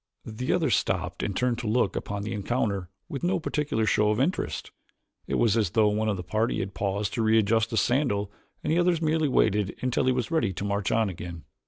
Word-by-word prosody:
The 115 +3 -3
others 160 - +2
stopped - - -1
and 100 -3 -2
turned 125 -2 +1
to 120 - -4
look 120 +4 +1
upon 100 0 -3
the 105 - -3
encounter 100 -3 -1 0.2
with 140 - -5
no 180 +1 +1
particular 150 -8 -1
show 105 0 +3
of 105 +2 +1
interest. 135 - -1 0.6
It - - -1
was 115 -3 +3
as 110 -6 +2
though 105 +3 +3
one 110 +1 0
of 100 - 0
the 90 - -5
party 110 +6 0
had 95 0 -4
paused 100 0 -2
to 115 - -1
readjust 110 0 +3
a 115 - -1
sandal 110 -7 +1 0.3
and - - +1
the 170 - +3
others 175 -1 +3
merely 160 -1 +1
waited 105 -6 +2
until 125 0 0
he 130 - +4
was 125 +4 -2
ready 135 -12 +1
to 95 +3 -4
march 100 0 -1
on 110 -1 +2
again. 85 -2 -7
110 Hz, 220 wpm, -27 LUFS, 100-130 Hz, 0.6 s, he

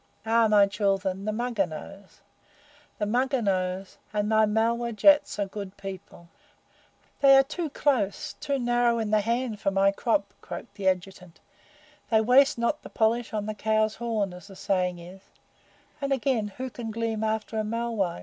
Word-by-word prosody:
Aha! 225 0 +4
my 210 -1 +6
children, 195 -1 -1
the 215 - 0
Mugger 230 -3 -1
knows 190 +5 -11 0.8
the 210 - -1
Mugger 255 +5 +1
knows 185 -2 -2
and 210 -1 -1
my 220 0 +4
Malwah 230 +2 0
Jats 290 +6 +4
are 205 - +1
a - - -3
good 195 0 -8
people!" 190 -3 -9 0.9
"They 275 -1 +7
are 270 - +6
too 315 +3 -4
close 250 -9 0
too 285 -2 -1
narrow 240 -1 +2
in 220 -2 -2
the 215 -1 +4
hand 230 0 -2
for - - 0
my 195 0 +3
crop," 200 -1 -1
croaked - - -8
the 200 -2 -3
Adjutant. 180 -2 -2 0.7
"They 220 - +4
waste 250 +5 +4
not 235 +6 0
the - - -11
polish 230 +1 0
on 210 -1 -2
the 215 - -3
cow's 215 0 +1
horn, 220 -5 -2
as 180 +2 -12
the 195 - -12
saying 185 -2 -1
is; 180 +3 -12 0.8
and, 275 0 -2
again, 260 -4 +1
who 255 +6 -6
can 235 -2 -6
glean 225 0 -2
after 220 0 -2
a - - 0
Malwai?" 225 - -2
215 Hz, 175 wpm, -26 LUFS, 195-235 Hz, 0.9 s, They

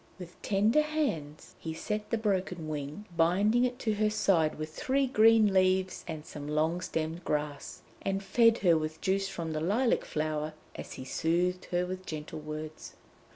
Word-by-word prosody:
With 180 -2 -11
tender 215 +8 +3
hands 275 - -3
he 160 -1 -5
set 210 +4 -3
the 230 - +1
broken 190 -6 -1
wing, 150 +6 -5
binding 200 +9 +3
it 250 0 -2
to 220 - +1
her 215 +1 +2
side 195 -7 +2
with 155 0 -5
three 270 +9 +1
green 225 -4 +5
leaves 185 0 +2
and 160 -2 -6
some 145 -2 -8
long 160 +4 0
stemmed 160 0 -3
grass, 150 -2 -3 0.2
and 195 0 -1
fed 230 +4 +4
her 170 -2 +6
with 155 0 -2
juice 195 +1 0
from 170 -4 -4
the 155 - -2
lilac 225 +9 +2
flower 155 0 -2 0.2
as - - -8
he 130 - -8
soothed 175 +6 0
her 175 0 0
with 185 +1 -6
gentle 155 0 -5
words. 155 +1 -7
180 Hz, 170 wpm, -30 LUFS, 155-210 Hz, 0.2 s, her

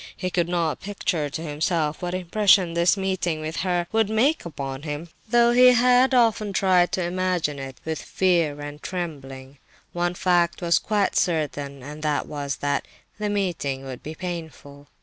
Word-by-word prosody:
He 185 -1 -3
could 175 -1 0
not 170 -3 0
picture 180 -6 -2
to 150 - -5
himself 155 0 -1
what 180 0 -2
impression 185 -1 +3
this 170 0 +3
meeting 185 -4 -1
with 155 +1 -5
her 180 -2 0
would 220 -2 +2
make 245 - +2
upon 135 -4 -5
him, 150 +2 -5 0.2
though 235 0 +5
he 250 +1 +7
had 250 +2 +4
often 220 -4 +2
tried 185 -2 +3
to 185 - 0
imagine 175 -4 -1
it, 135 -1 -7
with 160 0 -3
fear 170 -6 +1
and 145 0 -8
trembling. 135 -6 -6 0.3
One 175 0 -1
fact 175 -2 +2
was 170 -1 +2
quite 205 -2 0
certain, 145 -5 -1
and 150 +3 -8
that 150 -2 0
was 140 -2 -4
that 145 - 0 0.3
the 210 0 -1
meeting 175 -10 -2
would 130 -2 -7
be 155 +1 -7
painful. 160 -5 -7
170 Hz, 170 wpm, -24 LUFS, 150-190 Hz, 0.3 s, he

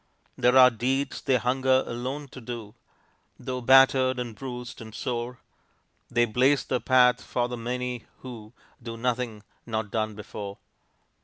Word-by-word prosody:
There 125 +2 +4
are 125 -1 +9
deeds 130 +5 -1
they 130 -2 +2
hunger 130 +1 +2
alone 130 +5 -4
to 130 - -11
do; 115 -3 -7 0.6
Though 130 -1 -4
battered 130 0 +5
and 120 -2 -4
bruised 125 +1 -7
and 110 -1 -10
sore, 120 +2 -3 0.7
They 120 +1 +3
blaze 130 +5 +2
the 125 - -1
path 125 -1 +4
for 120 -1 -1
the 125 - -5
many, 125 0 -4 0.2
who 115 -4 -9 0.3
Do 115 -1 -7
nothing 120 -3 -2 0.2
not 110 -3 -3
done 110 -1 -1
before. 100 -1 -7
125 Hz, 145 wpm, -26 LUFS, 115-130 Hz, 0.7 s, are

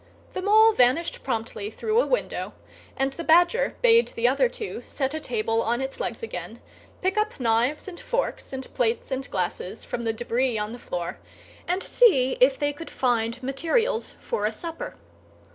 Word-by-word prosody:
The - - -3
Mole 435 +3 +6
vanished 255 +3 +2
promptly 225 -4 -3
through 440 - +1
a - - -2
window; - - -1 0.4
and 270 0 0
the 335 - -6
Badger 350 +10 +4
bade 465 -1 +6
the 230 +1 0
other 280 - +3
two 435 -3 -6
set 270 0 -2
a 315 - -2
table 225 -4 0
on 235 +2 0
its 265 0 -4
legs - - -3
again, 460 - -6 0.4
pick 380 +2 +1
up 425 -6 -1
knives 240 +6 +1
and 355 -2 -8
forks - - -2
and 265 -1 -7
plates 235 +2 0
and 265 +1 -3
glasses 180 +2 -3
from 240 - -4
the 225 -1 0
débris 240 +1 0
on 210 +1 -2
the 240 - -8
floor, 175 -6 -4 0.5
and 365 +2 0
see 265 - +4
if 265 +1 +5
they 290 -1 0
could 325 +3 -9
find 240 0 0
materials 340 - 0
for 470 - -1
a - - -1
supper. 330 -2 -6
270 Hz, 180 wpm, -25 LUFS, 235-385 Hz, 0.5 s, Mole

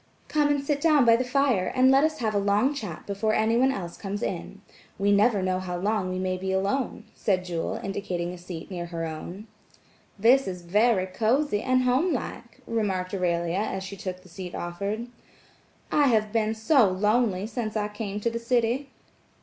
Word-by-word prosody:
"Come 300 -1 +2
and 285 -1 +1
sit 285 0 -1
down 300 -5 +5
by 230 -1 +7
the 245 - +1
fire 250 -7 +1
and 260 +1 +5
let 270 +2 +5
us 310 0 +1
have 220 -3 -1
a 205 - +2
long 205 +7 +2
chat 210 - -6
before 205 +2 0
anyone 230 +4 +3
else 175 -8 -5
comes 200 0 -4
in. - - -4 0.4
We 200 +1 +2
never 205 0 +3
know 185 0 0
how 180 -1 -4
long 200 0 0
we 185 - -3
may 185 0 -1
be 190 +1 -3
alone," 200 +6 -1
said 185 -3 0
Jewel, 170 -2 -3
indicating 185 -3 -3
a - - -8
seat 175 0 -8
near 175 -2 -4
her 165 -1 -4
own. 170 +6 -7 0.7
"This 245 +5 +4
is 180 -2 -5
very 205 +2 +3
cosy 220 +5 +1
and 255 0 +2
homelike," 260 +8 -1
remarked 195 -5 -1
Aurelia 170 -1 0
as 195 -2 -2
she 195 +1 -7
took 185 -1 -6
the - - -16
seat 180 0 -8
offered. 200 +6 -3 0.9
"I 290 -1 +4
have 215 -3 +2
been 220 -1 +1
so 220 0 +4
lonely 205 +1 +1
since 220 -1 -3
I 210 -1 0
came 210 -1 -5
to 235 - 0
the 230 - -3
city." 240 +3 0
210 Hz, 190 wpm, -26 LUFS, 185-240 Hz, 0.9 s, by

